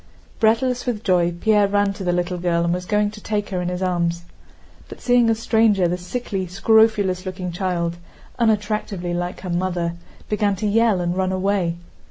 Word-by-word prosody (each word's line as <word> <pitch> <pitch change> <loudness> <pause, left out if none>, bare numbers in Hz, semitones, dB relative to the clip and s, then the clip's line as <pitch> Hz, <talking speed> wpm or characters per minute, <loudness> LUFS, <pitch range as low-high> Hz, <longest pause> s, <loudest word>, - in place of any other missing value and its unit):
Breathless 240 +3 +2
with 225 -3 -2
joy, 175 -3 +2
Pierre 205 +4 +2
ran 205 0 +1
to 195 -1 -7
the 180 - +1
little 175 0 -1
girl 170 -1 +1
and 170 0 +1
was 180 0 -4
going 210 -1 +1
to 210 0 -12
take 205 -1 -2
her 185 -2 -2
in 175 - -3
his 180 +1 -3
arms. 170 -2 -1 0.7
But - - -10
seeing 245 -2 +3
a 225 - +3
stranger 220 -4 +2
the 175 - 0
sickly, 190 +1 -4
scrofulous 200 -1 +3
looking 185 -1 -5
child, 170 -1 -2 0.4
unattractively 210 -5 0
like 175 +1 -3
her 180 -2 -5
mother, 175 -1 -1 0.3
began 205 -2 +1
to 195 - -4
yell 215 -2 +3
and 175 0 -1
run 190 0 0
away. 185 -2 0
190 Hz, 185 wpm, -21 LUFS, 175-210 Hz, 0.7 s, seeing